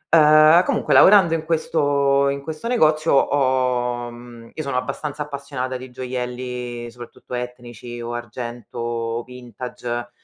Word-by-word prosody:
Uhm, 155 Hz, +2 st, +7 dB
comunque -, -, 0 dB
lavorando 190 Hz, -4 st, +7 dB
in 160 Hz, -1 st, -1 dB
questo 145 Hz, -4 st, +1 dB
in 140 Hz, 0 st, -3 dB
questo 155 Hz, +8 st, -6 dB
negozio 155 Hz, -9 st, +2 dB
ho 125 Hz, -3 st, +1 dB
mhmm, 120 Hz, -1 st, -13 dB
io 155 Hz, -, -5 dB
sono 140 Hz, -3 st, -2 dB
abbastanza 150 Hz, +3 st, -4 dB
appassionata 140 Hz, -3 st, -5 dB
di 130 Hz, +1 st, -10 dB
gioielli 125 Hz, -1 st, -5 dB
soprattutto 120 Hz, +1 st, -12 dB
etnici 120 Hz, -1 st, -7 dB
o 120 Hz, 0 st, -5 dB
argento 120 Hz, 0 st, -7 dB
o 115 Hz, 0 st, -3 dB
vintage, 125 Hz, -1 st, -7 dB
125 Hz, 130 wpm, -21 LUFS, 120-145 Hz, -, Uhm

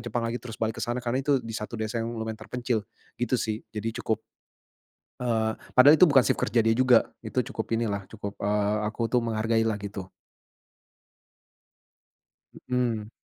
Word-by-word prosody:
Jepang 120 Hz, +1 st, -1 dB
lagi 115 Hz, +1 st, -2 dB
terus 115 Hz, -3 st, -8 dB
balik 110 Hz, 0 st, -2 dB
ke -, -, -3 dB
sana, 120 Hz, +1 st, -2 dB
karena 125 Hz, +3 st, 0 dB
itu 140 Hz, -2 st, +3 dB
di 115 Hz, -, -6 dB
satu 110 Hz, +1 st, -5 dB
desa 110 Hz, +1 st, -2 dB
yang 115 Hz, +1 st, -4 dB
lumayan 110 Hz, 0 st, -4 dB
terpencil, 120 Hz, -2 st, -2 dB, 0.4 s
gitu 125 Hz, +1 st, +1 dB
sih 110 Hz, -2 st, -2 dB
jadi 110 Hz, +1 st, -3 dB
cukup 110 Hz, 0 st, -1 dB, 1.0 s
eee, 110 Hz, -2 st, +1 dB, 0.2 s
padahal 140 Hz, +5 st, +9 dB
itu 185 Hz, -, +8 dB
bukan 135 Hz, -3 st, +6 dB
shift -, -, +1 dB
kerja 115 Hz, +2 st, +2 dB
dia 115 Hz, -, +4 dB
juga, 130 Hz, -2 st, +5 dB
itu -, -, -2 dB
cukup 110 Hz, +1 st, -2 dB
inilah 105 Hz, -3 st, -1 dB
cukup, 100 Hz, -2 st, -6 dB
eee, 105 Hz, +1 st, +1 dB
aku 115 Hz, +1 st, -2 dB
tuh 125 Hz, -, +4 dB
menghargai 115 Hz, 0 st, +1 dB
lah 110 Hz, -, +1 dB
gitu. 100 Hz, -2 st, -6 dB, 2.6 s
Hmm. 120 Hz, -4 st, 0 dB
115 Hz, 170 wpm, -27 LUFS, 110-120 Hz, 2.6 s, padahal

